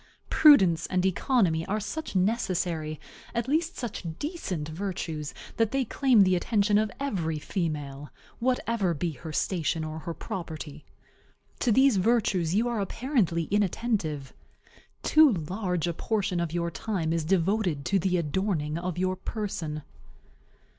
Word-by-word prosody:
Prudence 190 Hz, -, +6 dB
and 185 Hz, 0 st, 0 dB
economy 190 Hz, -4 st, +2 dB
are 210 Hz, +2 st, 0 dB
such 215 Hz, +6 st, -5 dB
necessary, 180 Hz, -6 st, 0 dB, 0.4 s
at 235 Hz, +1 st, -1 dB
least 325 Hz, +5 st, 0 dB
such 240 Hz, -7 st, -5 dB
decent, 215 Hz, -, -4 dB
virtues, 160 Hz, -3 st, -4 dB, 0.3 s
that 225 Hz, -2 st, +3 dB
they 270 Hz, +2 st, 0 dB
claim 250 Hz, -2 st, +4 dB
the 185 Hz, -1 st, +5 dB
attention 205 Hz, +2 st, +2 dB
of 215 Hz, 0 st, +1 dB
every 180 Hz, -, -1 dB
female, 150 Hz, -4 st, -3 dB, 0.3 s
whatever 230 Hz, -7 st, 0 dB
be 170 Hz, +3 st, -1 dB
her 155 Hz, +3 st, -8 dB
station 165 Hz, -1 st, 0 dB
or 155 Hz, 0 st, -5 dB
her 165 Hz, +1 st, -5 dB
property. 155 Hz, -3 st, -6 dB, 0.8 s
To 245 Hz, -, +2 dB
these 265 Hz, -1 st, +5 dB
virtues 190 Hz, -5 st, +2 dB
you 230 Hz, +4 st, +2 dB
are 235 Hz, -3 st, -1 dB
apparently 200 Hz, -, 0 dB
inattentive. 195 Hz, -, 0 dB, 0.7 s
Too 310 Hz, -4 st, +6 dB
large 180 Hz, 0 st, -2 dB
a 170 Hz, -, -1 dB
portion 195 Hz, -1 st, -1 dB
of 170 Hz, -2 st, -1 dB
your 170 Hz, 0 st, -1 dB
time 170 Hz, -4 st, -2 dB
is 165 Hz, -1 st, 0 dB
devoted 180 Hz, -2 st, +1 dB
to 195 Hz, -, +2 dB
the 180 Hz, 0 st, +1 dB
adorning 165 Hz, -1 st, -1 dB
of 180 Hz, -1 st, -4 dB
your 185 Hz, +1 st, 0 dB
person. 180 Hz, -7 st, -4 dB
185 Hz, 140 wpm, -27 LUFS, 160-220 Hz, 0.8 s, Prudence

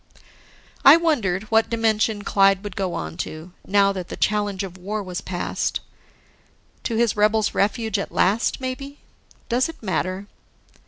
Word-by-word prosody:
I 280 Hz, +4 st, +10 dB
wondered 225 Hz, -, 0 dB
what 225 Hz, 0 st, +3 dB
dimension 220 Hz, -2 st, +1 dB
Clyde 195 Hz, -1 st, +3 dB
would 205 Hz, -3 st, -7 dB
go 190 Hz, -3 st, -2 dB
on 80 Hz, +1 st, -5 dB
to, 160 Hz, -, -6 dB, 0.2 s
now 200 Hz, 0 st, +4 dB
that 185 Hz, -2 st, -5 dB
the -, -, -7 dB
challenge 205 Hz, -2 st, 0 dB
of 185 Hz, -2 st, -7 dB
war 205 Hz, +3 st, -4 dB
was 180 Hz, -2 st, -5 dB
past. 180 Hz, -2 st, -2 dB, 1.1 s
To 230 Hz, -, -1 dB
his 235 Hz, -1 st, +2 dB
rebels 215 Hz, +1 st, +2 dB
refuge 215 Hz, 0 st, 0 dB
at -, -, -4 dB
last 205 Hz, +5 st, +1 dB
maybe? 270 Hz, +2 st, -5 dB, 0.5 s
Does 250 Hz, +5 st, +1 dB
it 325 Hz, -, -11 dB
matter? 185 Hz, +1 st, -2 dB
205 Hz, 150 wpm, -23 LUFS, 190-225 Hz, 1.1 s, I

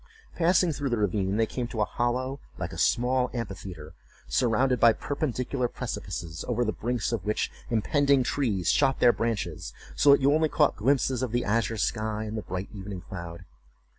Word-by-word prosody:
Passing 175 Hz, 0 st, +3 dB
through 145 Hz, -2 st, -2 dB
the 120 Hz, -, 0 dB
ravine, 100 Hz, -1 st, 0 dB
they 115 Hz, -, +3 dB
came 120 Hz, +2 st, -4 dB
to 115 Hz, -3 st, -3 dB
a -, -, +3 dB
hollow, 130 Hz, +4 st, -1 dB, 0.2 s
like -, -, -4 dB
a -, -, -7 dB
small 125 Hz, +1 st, +2 dB
amphitheatre, 95 Hz, -8 st, -6 dB, 0.3 s
surrounded 125 Hz, +1 st, +2 dB
by 115 Hz, -1 st, +6 dB
perpendicular 130 Hz, -2 st, -2 dB
precipices, 85 Hz, -10 st, -5 dB
over 120 Hz, 0 st, 0 dB
the 110 Hz, -, -1 dB
brinks 120 Hz, -2 st, -2 dB
of 115 Hz, -6 st, -2 dB
which 105 Hz, +1 st, -1 dB, 0.2 s
impending 140 Hz, +4 st, +2 dB
trees 110 Hz, -, 0 dB
shot 135 Hz, -, +2 dB
their 120 Hz, -1 st, +6 dB
branches, 115 Hz, -2 st, -3 dB, 0.2 s
so 145 Hz, -, +4 dB
that 140 Hz, 0 st, +7 dB
you 140 Hz, +2 st, +4 dB
only 155 Hz, 0 st, +2 dB
caught 150 Hz, -1 st, +3 dB
glimpses 130 Hz, +1 st, +1 dB
of 130 Hz, -4 st, -2 dB
the 120 Hz, +1 st, 0 dB
azure 115 Hz, +2 st, 0 dB
sky 110 Hz, 0 st, -1 dB
and 110 Hz, 0 st, -5 dB
the 110 Hz, -, -2 dB
bright 95 Hz, 0 st, -5 dB
evening 95 Hz, -2 st, -7 dB
cloud. 85 Hz, -2 st, -8 dB
120 Hz, 180 wpm, -27 LUFS, 105-130 Hz, 0.3 s, that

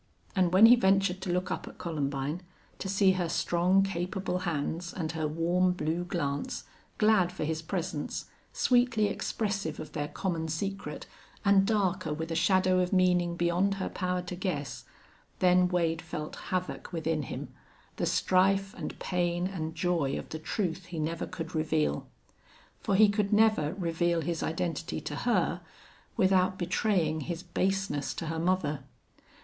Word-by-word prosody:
And 185 Hz, -3 st, +3 dB
when 190 Hz, +4 st, +8 dB
he 240 Hz, +2 st, +9 dB
ventured 195 Hz, -4 st, +2 dB
to 190 Hz, -2 st, -2 dB
look 180 Hz, +1 st, -1 dB
up -, -, -3 dB
at -, -, -10 dB
Columbine, 145 Hz, 0 st, -2 dB, 0.4 s
to 190 Hz, -, -4 dB
see 195 Hz, 0 st, +4 dB
her 180 Hz, -3 st, -1 dB
strong, 180 Hz, +3 st, +3 dB
capable 185 Hz, 0 st, -2 dB
hands 165 Hz, +3 st, -3 dB
and 160 Hz, -4 st, -3 dB
her 160 Hz, -2 st, -1 dB
warm, 175 Hz, +4 st, +2 dB
blue 170 Hz, +1 st, -2 dB
glance, 145 Hz, -6 st, -2 dB, 0.3 s
glad 210 Hz, -5 st, +4 dB
for 180 Hz, -, -4 dB
his 160 Hz, +1 st, -1 dB
presence, 160 Hz, -3 st, -3 dB, 0.3 s
sweetly 245 Hz, -3 st, +3 dB
expressive 200 Hz, -8 st, -2 dB
of 155 Hz, -1 st, -7 dB
their 145 Hz, -1 st, -2 dB
common 165 Hz, 0 st, -2 dB
secret 195 Hz, +5 st, -4 dB, 0.4 s
and 195 Hz, -1 st, +5 dB
darker 190 Hz, -6 st, +1 dB
with 160 Hz, +1 st, -4 dB
a -, -, -1 dB
shadow 185 Hz, +1 st, +3 dB
of 180 Hz, 0 st, 0 dB
meaning 180 Hz, -2 st, +3 dB
beyond 175 Hz, +3 st, +1 dB
her 195 Hz, -, -3 dB
power 180 Hz, -1 st, -2 dB
to 180 Hz, 0 st, -5 dB
guess, 175 Hz, -8 st, -3 dB, 0.5 s
then 180 Hz, 0 st, +4 dB
Wade 165 Hz, -2 st, 0 dB
felt 160 Hz, -2 st, -6 dB
havoc 185 Hz, 0 st, -3 dB
within 160 Hz, -2 st, -1 dB
him, 135 Hz, -1 st, -6 dB, 0.5 s
the -, -, 0 dB
strife 195 Hz, +1 st, +2 dB
and -, -, -6 dB
pain 175 Hz, -1 st, 0 dB
and 160 Hz, -4 st, -4 dB
joy 165 Hz, -4 st, 0 dB
of -, -, -7 dB
the 155 Hz, -, -5 dB
truth 180 Hz, +1 st, -2 dB
he 175 Hz, -2 st, -7 dB
never 160 Hz, +2 st, -2 dB
could 165 Hz, -3 st, -6 dB
reveal. 75 Hz, -, 0 dB, 0.7 s
For 195 Hz, -, 0 dB
he 215 Hz, +2 st, +7 dB
could 205 Hz, -1 st, 0 dB
never 210 Hz, -8 st, +3 dB
reveal 170 Hz, -2 st, 0 dB
his 165 Hz, +1 st, -2 dB
identity 165 Hz, -1 st, -2 dB
to 150 Hz, 0 st, -5 dB
her 180 Hz, -2 st, +1 dB, 0.6 s
without 185 Hz, -2 st, +3 dB
betraying 175 Hz, -3 st, +1 dB
his 170 Hz, +1 st, -4 dB
baseness 190 Hz, -4 st, -1 dB
to -, -, -4 dB
her 160 Hz, 0 st, -2 dB
mother. 160 Hz, -5 st, 0 dB
175 Hz, 155 wpm, -29 LUFS, 160-190 Hz, 0.7 s, he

